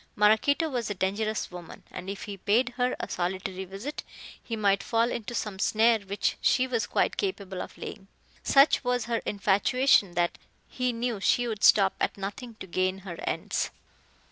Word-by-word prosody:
Maraquito 220 +10 +3
was 245 -7 -2
a 205 - -3
dangerous 205 +3 -1
woman, 175 -2 -10
and 185 - -7
if 200 0 -5
he 205 - -6
paid 220 +6 +2
her 250 +1 -1
a - - -3
solitary 185 +1 -3
visit, 195 +11 -6 0.4
he 230 - -4
might 200 -2 +2
fall 230 +1 +1
into 235 +1 -4
some 205 -4 -3
snare 225 +2 +3
which 200 0 -2
she 255 - +3
was 240 -3 -1
quite - - 0
capable 200 - -3
of - - -9
laying. 195 -2 -8 0.3
Such 275 +1 +5
was 245 -1 0
her 230 0 -1
infatuation, 205 +1 +3
that 175 0 0 0.3
he 250 -1 -1
knew 235 -2 -2
she 245 +5 +2
would 215 -3 -4
stop 195 -2 +6
at - - 0
nothing 205 +4 -6
to 215 - -9
gain 185 +1 0
her 175 -3 -7
ends. - - -1
210 Hz, 175 wpm, -28 LUFS, 195-245 Hz, 0.4 s, stop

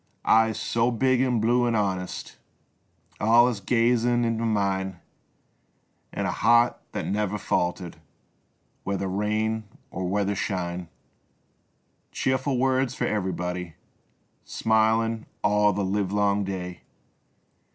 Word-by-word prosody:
Eyes 110 0 +3
so 115 +1 +1
big 130 +1 +2
an' 125 -3 +1
blue 120 +2 +2
an' 115 - +1
honest 95 -3 -3 0.8
Alius 115 +1 +4
gazin' 120 +3 +2
int' 115 -1 -1
mine, 100 -5 -1 1.1
An' - - -3
a - - 0
heart 120 +1 +3 0.2
that - - -3
never 105 0 -1
faltered 90 -3 -2 0.9
Whether 100 0 -2
rain 110 +3 -1 0.3
or 95 0 -3
whether 100 +1 0
shine. 90 -3 -3 1.2
Cheerful 130 0 0
words 130 0 +1
for - - -1
ev'r'body, 90 -4 -3 0.7
Smilin' 110 0 +1 0.2
all 105 0 +3
the 100 0 -1
livelong 100 +1 0
day. 90 -2 -5
105 Hz, 105 wpm, -25 LUFS, 95-115 Hz, 1.2 s, Alius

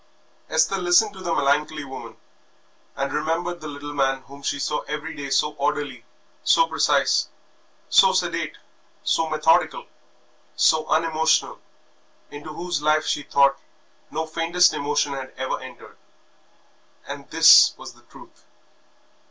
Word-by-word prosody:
Esther 160 +5 +1
listened 180 +4 +3
to 190 - -12
the 175 -2 -3
melancholy 150 +1 0
woman, 135 -1 -10 0.8
and - - -3
remembered 170 +2 -2
the 155 - -7
little 145 0 -8
man 135 -1 0
whom 140 +1 -14
she 140 - -2
saw 150 +1 -2
every 150 +2 -5
day 140 -1 -6
so 150 +2 +1
orderly, 140 -3 -2 0.4
so - - +4
precise, - - +1 0.6
so 480 - +5
sedate, - - -2 0.5
so 165 -1 0
methodical, 160 - +1 0.7
so 155 0 +2
unemotional, 160 0 +1 0.7
into 145 +2 -9
whose 175 0 -4
life 155 +1 +2
she - - -1
thought 140 -1 +2 0.5
no 160 - -3
faintest 165 +2 +2
emotion 145 0 -1
had 135 -1 -8
ever 130 0 -3
entered 130 -1 -13 1.1
and - - -8
this - - +7
was - - -10
the - - -22
truth. - - -18
150 Hz, 130 wpm, -23 LUFS, 140-165 Hz, 1.1 s, this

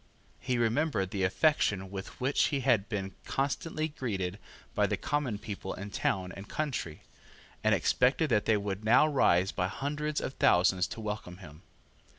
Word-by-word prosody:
He 125 -1 -1
remembered 115 - +1
the 100 -3 -2
affection 95 - +2
with 95 -1 -7
which 135 +3 +2
he 140 -2 0
had 115 -6 +2
been 95 -3 -3
constantly 155 +3 -2
greeted 100 - -3 0.3
by - - +2
the - - -1
common 140 -7 -1
people 100 -3 -6
in 100 +2 -7
town 95 -2 -1
and 95 +2 -10
country, 130 - -3 0.6
and - - +4
expected 135 +4 +2
that 105 -2 +3
they 110 - +3
would 100 0 -4
now 120 +7 +6
rise 95 - +3
by 90 -1 -1
hundreds 150 +8 -2
of - - -4
thousands 90 -2 +3
to 115 - -7
welcome 105 -4 -5
him. 80 -4 -13
105 Hz, 160 wpm, -30 LUFS, 95-135 Hz, 0.6 s, now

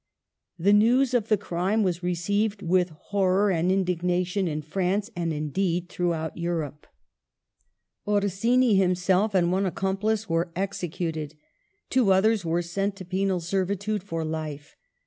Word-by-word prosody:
The 195 +4 +3
news 245 +5 +4
of 230 -3 +1
the 215 - +3
crime 195 +3 0
was 180 -2 -1
received 200 +4 -1
with 180 +1 +2 0.2
hori'or 195 0 +2
and 175 +2 +1
indignation 180 0 0
in 155 -1 -3
France, 195 +7 -1
and 170 -1 -1
indeed 170 +4 -1
throughout 170 -3 -2
Europe. 165 -4 -4 1.2
Orsini 210 +4 +2
himself 190 +2 +2
and 175 -2 +3
one 190 +1 +1
accomplice 200 +4 -1
were 165 0 0
executed; 170 -5 -3 0.6
two 255 -2 +3
othei 195 +3 +4
s 210 -4 -3
were 170 +1 0
sent 195 +4 -2
to 190 - -9
penal 190 0 0
servitude 195 +4 -1
for 165 -4 -4
life. 155 -2 -5
185 Hz, 135 wpm, -26 LUFS, 170-200 Hz, 1.2 s, news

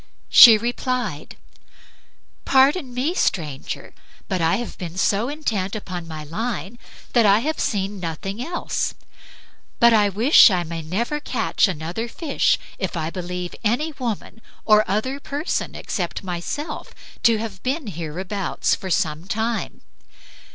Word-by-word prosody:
She 230 -4 +10
replied, 240 - -3 1.1
"Pardon 270 +2 +3
me, 255 +7 -1
stranger, 150 - -2 0.3
but 185 -2 -1
I 165 0 +3
have 240 -1 -5
been 175 -1 -6
so 205 +5 +1
intent 220 -11 -2
upon 180 -5 -6
my 155 -1 -7
line 215 +6 -4 0.3
that 235 -4 +5
I 200 +1 +6
have 310 +4 -2
seen 200 -5 -1
nothing 190 +6 -4
else; 345 +5 -2 0.8
but 235 0 +6
I 210 -2 +4
wish 230 - +7
I 180 -3 0
may 165 0 -5
never 225 - -2
catch 245 -6 +1
another 175 +6 -4
fish 285 +4 +1 0.2
if 185 -2 -3
I 160 0 -2
believe 180 -1 -5
any 245 +9 +1
woman 230 -2 -4 0.2
or 215 -2 +4
other 255 +8 -1
person 285 +3 -3
except 180 +1 -4
myself 185 - -5 0.3
to 230 -2 +4
have 215 -4 -6
been 275 +3 -2
hereabouts 180 +2 -2
for 190 - -4
some 165 -2 -1
time." 225 +2 -2
210 Hz, 135 wpm, -22 LUFS, 180-245 Hz, 1.1 s, She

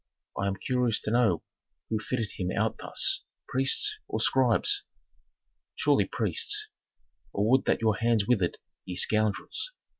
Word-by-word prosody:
"I 100 - -1
am 100 - -1
curious 125 0 0
to 105 - -3
know 115 -8 +2 0.5
who 110 - -1
fitted 110 0 -3
him 90 -1 -4
out - - -1
thus: - - +2 0.2
priests, 135 - +2
or - - -3
scribes?" 405 -1 +3 0.9
"Surely - - +2
priests. 420 +1 -1 0.7
Oh, 100 - +1
would 130 +5 +3
that - - +1
your 110 -2 +2
hands 115 -3 +1
withered, 100 -8 +1 0.3
ye 90 - -6
scoundrels! 110 - 0
115 Hz, 140 wpm, -28 LUFS, 105-130 Hz, 0.9 s, scribes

